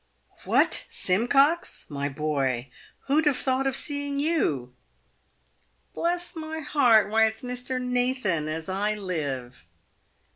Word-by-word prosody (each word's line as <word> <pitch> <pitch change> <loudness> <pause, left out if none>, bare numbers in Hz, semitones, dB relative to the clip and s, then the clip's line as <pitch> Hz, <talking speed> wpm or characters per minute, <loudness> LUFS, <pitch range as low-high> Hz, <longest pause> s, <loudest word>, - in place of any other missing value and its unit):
" - - -25
"What, - - +3
Simcox, 275 - +2
my 140 -1 -3
boy, 135 -4 -2 0.3
who'd 295 +2 +2
have 285 - +3
thought 265 0 0
of 265 - 0
seeing 285 -1 -2
you 220 - 0 0.4
?" - - -40
" 60 +2 -42
Bless 350 +1 -2
my 320 0 -5
heart! 235 -9 +4
why 220 0 +5
it's 220 +4 -6
Mr. 250 +1 -3
Nathan, 250 - 0
as 160 +1 -4
I 205 +3 -1
live 140 - -4
220 Hz, 135 wpm, -26 LUFS, -, 0.4 s, why